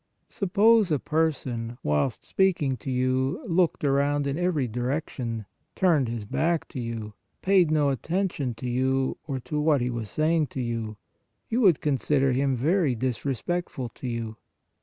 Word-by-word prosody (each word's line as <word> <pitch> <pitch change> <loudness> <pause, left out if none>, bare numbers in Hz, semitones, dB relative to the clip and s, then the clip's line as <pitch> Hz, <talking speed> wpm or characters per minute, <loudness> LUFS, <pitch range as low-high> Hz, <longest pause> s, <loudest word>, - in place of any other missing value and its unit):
Suppose 210 +2 +3
a 150 - +2
person, 130 -7 -1
whilst 75 - 0
speaking 170 -9 +1
to 115 - -7
you, 130 +1 +1
looked 175 -5 +1
around 140 +1 +2
in 140 0 -1
every 170 -6 0
direction, 120 -2 -3 0.3
turned 160 -10 +3
his 115 -3 -4
back 165 +9 0
to 130 - -6
you, 115 -3 -5 0.3
paid 190 -4 +4
no 150 -2 +3
attention 150 - -1
to 125 - -6
you, 130 +2 0
or 135 -3 -2
to 150 +4 -3
what 150 -2 +3
he 125 0 -1
was 115 -3 -4
saying 155 +2 +1
to 130 - -7
you, 115 -3 -3 0.5
you 240 +3 +1
would 180 - +5
consider 135 -1 +2
him 135 +1 +1
very 150 +1 +2
disrespectful 130 +3 -2
to 130 - -8
you. 115 -2 -4
135 Hz, 155 wpm, -26 LUFS, 120-160 Hz, 0.5 s, would